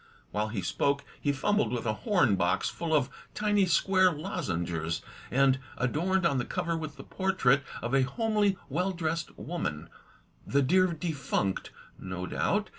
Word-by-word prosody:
While 105 +1 0
he 105 -4 -3
spoke 140 +9 +1 0.2
he 145 - +2
fumbled 140 - +1
with 120 -2 -2
a 110 - +1
horn 145 - +2
box 90 -1 +1
full 170 -2 -4
of 140 -4 +3 0.3
tiny 205 -2 +2
square 185 +1 +4
lozengers, 85 - -2 0.3
and 135 +1 +3 0.2
adorned 170 +9 +1
on 140 -6 +3
the - - 0
cover 170 +1 -2
with 155 -2 -5
the - - -10
portrait 185 -9 +2 0.2
of 120 +2 -2
a 135 - +5
homely 210 - +1
well 180 +7 0
dressed 165 -1 -3
woman, 80 - -4 0.5
"the 140 +1 +2
dear 185 +7 +4
defunct," 150 - -2 0.3
no 90 -1 -5
doubt. 205 - 0
145 Hz, 155 wpm, -29 LUFS, 120-185 Hz, 0.5 s, a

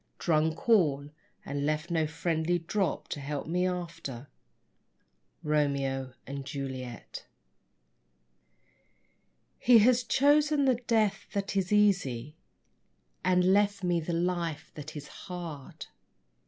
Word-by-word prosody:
drunk 160 +1 0
all, 150 -10 +3 0.3
and 140 0 -3
left 155 +3 -1
no 160 -2 +1
friendly 165 +2 0
drop_ 180 +3 -2
To - - -4
help 140 0 -4
me 180 +3 0
after. 165 -8 -5 1.1
Romeo 140 -3 0
and 140 0 -5
Juliet. 130 -3 -6 2.3
He 245 -1 +7
has 240 +3 +5
chosen 290 +3 +3
the 255 -3 +3
death 215 -4 +1
that 200 -1 -2
is 190 -1 0
easy 180 - +2 0.9
And 180 0 +4
left 200 -1 +2
me 175 -1 +2
the 165 +1 -4
life 170 -3 -2
that 150 0 -9
is 150 -1 -7
hard. 170 -7 -8
165 Hz, 110 wpm, -29 LUFS, 145-195 Hz, 2.3 s, He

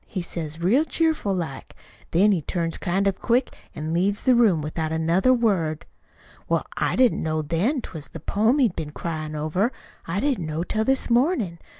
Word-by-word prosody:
he 195 - -4
says 165 -2 -5
real 215 - +3
cheerful 320 -9 0
like. 165 -8 -4 0.3
Then 200 +5 +4
he 180 -5 +1
turns 165 +2 -2
kind 190 +2 0
of 195 -1 0
quick 250 +2 +1 0.2
an' 155 +1 -3
leaves 195 +4 +1
the 260 - +5
room 210 -10 +4
without 155 +1 -3
another 165 +9 +2
word. 190 -11 +1 0.6
"Well, - - +1
I - - 0
didn't 255 -2 +3
know 155 -1 -1
then 170 - 0
that't - - -10
was 155 -3 -8
the 165 - -8
poem 220 - +1
he'd 240 -10 +2
been 150 -1 -5
cryin' 155 -2 -4
over. 155 - 0 0.4
I 170 +4 -1
didn't 245 - 0
know 155 +2 -2
till 220 +4 -1
this 265 -1 +1
mornin'. 235 - +1
180 Hz, 190 wpm, -24 LUFS, 160-235 Hz, 0.6 s, the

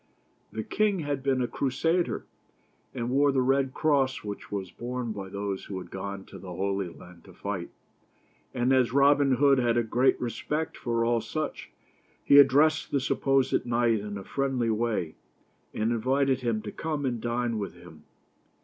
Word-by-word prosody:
The 110 - -4
king 205 - +1
had 145 -2 -2
been 130 -2 +1
a - - 0
Crusader, 165 +8 0 0.7
and 120 -1 -3
wore 140 +2 +4
the 130 -1 +2
red 135 +1 +2
cross 140 -3 +1
which 105 -1 -7
was 95 -3 -4
borne 120 -1 -4
by 100 -2 -6
those 100 0 -4
who 95 - -6
had 90 -2 -8
gone 95 0 -6
to - - -11
the 95 - -9
Holy 95 0 -1
Land 85 0 -14
to 95 - -14
fight; 95 -1 -4 0.8
and 125 +1 +1
as 130 -2 +3
Robin 140 0 +5
Hood 135 +1 +4
had 120 -1 +2
a 120 - +3
great 120 +4 +2
respect 150 +6 -3
for 115 -1 -1
all 115 -1 +2
such, 155 +5 -4 0.5
he 140 - +7
addressed 145 +3 +5
the 140 - +1
supposed 135 0 +1
knight 120 -2 +2
in 105 0 -6
a 100 - -7
friendly 130 -1 -1
way, 110 -8 -1 0.6
and 110 +2 -1
invited 130 +3 +1
him 115 -4 -1
to 105 - -5
come 155 -3 -3
and 120 -3 -2
dine 120 -1 -1
with 100 -4 -5
him. 85 -3 -14
120 Hz, 175 wpm, -28 LUFS, 105-135 Hz, 0.8 s, he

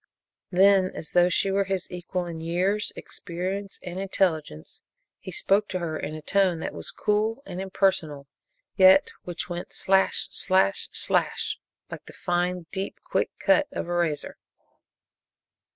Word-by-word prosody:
Then, 190 0 +5
as 155 - -6
though 175 0 +5
she 195 +2 +1
were 195 0 +2
his 190 -1 -2
equal 180 0 -3
in 170 -2 -6
years, 185 +6 0
experience 190 +3 -5
and 180 0 -5
intelligence, 165 - -1 0.4
he 185 - -8
spoke 200 +4 +2
to 185 - -3
her 170 -3 -3
in 155 0 -4
a 155 - -8
tone 190 -1 +2
that - - -4
was - - -5
cool 215 +5 0
and 180 -6 -5
impersonal, 180 -7 0 0.5
yet 190 0 +6
which 175 -1 -4
went 175 0 -6
slash! 190 0 +2
slash! 185 - +2
slash! - - 0 0.3
like - - -8
the - - -11
fine, 175 0 -1
deep, 195 0 -4
quick - - 0
cut 295 0 +3
of - - -4
a 175 - -2
razor. 170 -4 -1
185 Hz, 150 wpm, -26 LUFS, 175-195 Hz, 0.5 s, yet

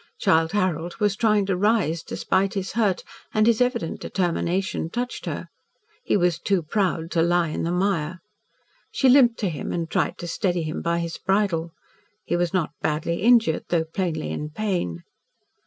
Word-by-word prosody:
Childe 160 +2 +3
Harold 175 -4 0
was 205 -2 +1
trying 210 -2 +2
to 190 -1 0
rise, 185 -5 +1
despite 195 +4 -1
his 195 -1 -2
hurt, 210 -5 +1 0.3
and 215 0 +4
his 230 0 +3
evident 250 -10 0
determination 180 -1 -1
touched 245 +5 -4
her. - - -4 0.6
He - - +2
was 175 -3 +1
too 190 -1 0
proud 165 -1 -1
to 165 - +2
lie 170 0 +2
in - - -3
the 170 - -1
mire. 180 -2 0 0.7
She 270 - +2
limped 250 -3 +6
to 200 - +1
him, 155 -4 -5
and 170 -1 -2
tried - - 0
to 175 - -6
steady 175 -1 -1
him 155 0 -4
by 170 0 0
his 170 -1 -4
bridle. 190 -5 0 0.5
He - - 0
was 175 0 0
not 180 -5 0
badly 160 +3 -1
injured, 225 -7 +4
though 165 -2 +1
plainly 160 -2 -3
in 150 - -4
pain. 155 - -2
180 Hz, 170 wpm, -24 LUFS, 165-205 Hz, 0.7 s, limped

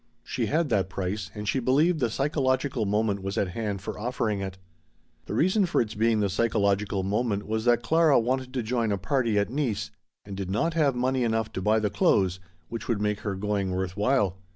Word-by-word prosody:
She - - -2
had 160 0 +1
that 95 -5 +1
price 95 +1 -3
and 105 0 -5
she 135 - +1
believed 150 +7 +2
the 120 - +1
psychological 130 -3 0
moment 105 -1 0
was 95 +3 -4
at 95 - +1
hand 100 0 -3
for - - -5
offering 110 -3 -1
it. 95 -1 -5 0.7
The - - -3
reason 185 - +3
for - - +1
its 110 -2 0
being 110 0 +2
the 100 - +2
psychological 100 -2 +1
moment 105 +1 -1
was 110 +1 -2
that 120 -1 +3
Clara 160 +2 +4
wanted 130 +2 -1
to 125 - 0
join 115 -1 0
a 100 - +1
party 115 +2 0
at 100 +2 +1
Nice 130 -7 -2 0.3
and 100 -1 -7
did 95 -1 -4
not 165 - 0
have 150 -5 +2
money 130 +1 +1
enough 115 -1 -1
to 95 - -3
buy 105 +3 +3
the 105 -2 0
clothes 95 -1 +2 0.3
which 115 - -6
would 115 -4 0
make 105 0 0
her 105 -2 -3
going 100 -1 -1
worth 95 -1 -2
while. 105 -4 +1
110 Hz, 210 wpm, -27 LUFS, 100-125 Hz, 0.7 s, Clara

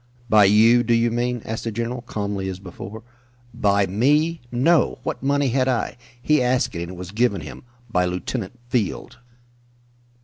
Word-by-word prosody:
"By 105 -2 +6
you, 110 +4 +6
do 120 -1 +2
you 115 0 +2
mean?" 120 0 -1
asked 110 0 -4
the 115 - -2
general, 120 +3 -3
calmly, 100 -4 -4
as 95 - -5
before. 95 +3 -9 0.5
"By 100 -1 +2
me? 145 - +1
No! 150 +7 +2
What - - -4
money 140 0 +1
had 130 +1 +1
I? 125 -3 -1 0.2
He 150 +3 +2
asked 125 0 +1
it 85 - -4
and 85 +1 -6
it - - -11
was 90 0 -7
given 110 -1 +1
him - - -9 0.3
by 90 -6 +1
Lieutenant 95 +5 -4
Field." 120 -5 -2
115 Hz, 170 wpm, -22 LUFS, 100-125 Hz, 0.5 s, By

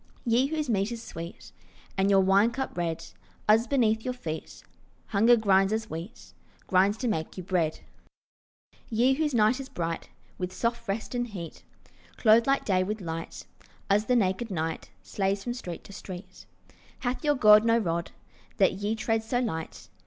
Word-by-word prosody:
Ye 240 +3 +3
whose 305 0 -2
meat 205 -1 0
is 235 -1 -6
sweet 170 +2 -9 0.4
And 195 0 +2
your 195 -1 +5
wine 195 +4 +4
cup 265 +3 -4
red, 170 -2 -2 0.4
Us 225 +3 +5
beneath 220 -5 +2
your 250 -1 -3
feet 160 -9 -7 0.5
Hunger 225 +4 +5
grinds 195 -2 +3
as 220 0 -2
wheat, 170 +9 -8 0.3
Grinds 195 +3 +3
to 250 - -2
make 160 -7 -2
you 185 - -5
bread. 170 -4 0 1.1
Ye 240 +4 +3
whose 300 -1 0
night 220 +4 +3
is 270 - -7
bright 165 -1 -4 0.3
With 180 0 -3
soft 235 0 -2
rest 200 +5 -3
and 245 0 -1
heat, 180 -7 -8 0.5
Clothed 225 +1 +5
like 275 0 +2
day 185 -2 +2
with 210 +3 -3
light, 165 -3 -6 0.5
Us 210 +2 +3
the 250 - +2
naked 205 +1 +1
night 160 - -3
Slays 195 - -1
from 240 - -2
street 180 -9 -7
to 200 - -12
street. 185 -1 -10 0.5
Hath 250 +5 -2
your 295 -1 +3
God 215 -4 +7
no 230 0 +4
rod, 170 -6 -1 0.5
That 190 - +4
ye 205 +3 -2
tread 225 0 0
so 245 +2 0
light? 160 -10 -4
210 Hz, 170 wpm, -28 LUFS, 185-235 Hz, 1.1 s, God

